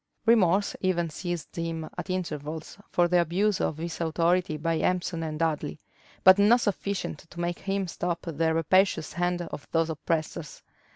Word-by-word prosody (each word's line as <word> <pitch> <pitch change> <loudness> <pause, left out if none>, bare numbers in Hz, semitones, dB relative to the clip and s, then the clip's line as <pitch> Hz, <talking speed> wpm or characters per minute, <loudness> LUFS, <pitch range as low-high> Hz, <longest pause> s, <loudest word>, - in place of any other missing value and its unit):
Remorse 205 -4 +4
even 175 -3 0
seized 175 0 -5
him 165 -1 -3
at - - -6
intervals 160 -4 -4
for 175 -1 +3
the 175 0 +4
abuse 190 +4 +1
of 155 - -1
his 165 +1 -5
authority 165 0 +1
by 165 +1 0
Empson 180 -2 0
and 155 -1 -3
Dudley; 155 - -1 0.4
but 185 +1 +8
not 230 +4 +6
sufficient 200 -6 -2
to 170 - -11
make 175 0 -2
him 195 -1 -1
stop 175 0 -2
the 165 -1 0
rapacious 185 +1 +2
hand 175 0 0
of 155 -3 -8
those 165 0 +2
oppressors. 155 -1 -3
170 Hz, 160 wpm, -27 LUFS, 160-185 Hz, 0.4 s, but